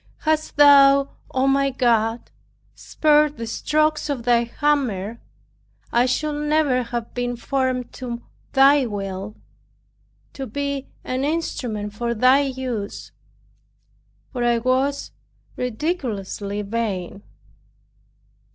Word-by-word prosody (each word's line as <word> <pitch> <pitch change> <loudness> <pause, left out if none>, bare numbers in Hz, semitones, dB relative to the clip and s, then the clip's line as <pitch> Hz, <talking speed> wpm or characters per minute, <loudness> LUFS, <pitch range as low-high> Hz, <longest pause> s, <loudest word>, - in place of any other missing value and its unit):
Hadst 310 0 0
thou, 280 -1 +7 0.2
O 265 +1 +1
my 275 0 +3
God, 235 -3 0 0.4
spared 300 -1 +2
the 230 - -4
strokes 305 +6 0
of 265 -5 -2
thy 235 0 +3
hammer, 235 -6 -1 0.7
I 240 +2 +3
should 295 +3 -1
never 295 -4 +2
have 235 -1 -5
been 245 0 -2
formed 255 0 -2
to 240 -2 -6 0.3
Thy 275 0 +5
will, 195 -1 -5 1.0
to 270 -1 -6
be 280 +3 -3 0.2
an 255 +1 -2
instrument 245 -9 -2
for 235 +2 -2
Thy 255 +4 +5
use; 255 -6 -4 1.2
for 245 -2 -2
I 240 0 +3
was 260 +4 0 0.4
ridiculously 220 - -3
vain. 200 -3 -3
255 Hz, 105 wpm, -22 LUFS, 230-280 Hz, 1.2 s, thou